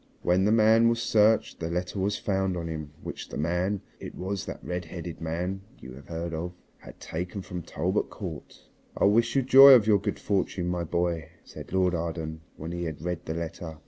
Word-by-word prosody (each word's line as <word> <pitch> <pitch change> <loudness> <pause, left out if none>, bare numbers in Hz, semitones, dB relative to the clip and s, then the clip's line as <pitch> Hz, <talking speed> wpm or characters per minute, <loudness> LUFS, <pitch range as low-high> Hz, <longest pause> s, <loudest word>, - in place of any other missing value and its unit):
When 90 +2 +3
the 105 - +3
man 115 +1 +5
was 115 0 0
searched 110 -1 +3
the 80 - -3
letter 90 +3 -3
was 100 +2 0
found 95 -3 -1
on 85 -1 -4
him 80 -2 -5
which - - -7
the - - -6
man 90 +6 0 0.2
it - - -8
was 95 +1 -4
that - - -7
redheaded 90 -1 -6
man 90 +4 -3 0.2
you 65 - -10
have 70 +2 -13
heard 85 0 -4
of 85 +3 -4 0.3
had - - -13
taken 90 +4 -5
from 90 -1 -6
Talbot 90 +5 -1
Court. 85 -8 -8 0.3
"I - - 0
wish 115 +5 +3
you 135 - +3
joy 135 +2 +10
of 115 -5 +4
your 105 -2 +4
good - - -3
fortune, 95 -3 -1
my 90 -1 -1
boy," 85 -1 -1
said - - -11
Lord 90 -1 +2
Arden 80 -2 -3 0.2
when 80 +2 -6
he 85 0 -3
had 80 -1 -6
read 90 -1 -3
the 80 - -2
letter. 80 -1 -6
90 Hz, 205 wpm, -27 LUFS, 80-100 Hz, 0.3 s, joy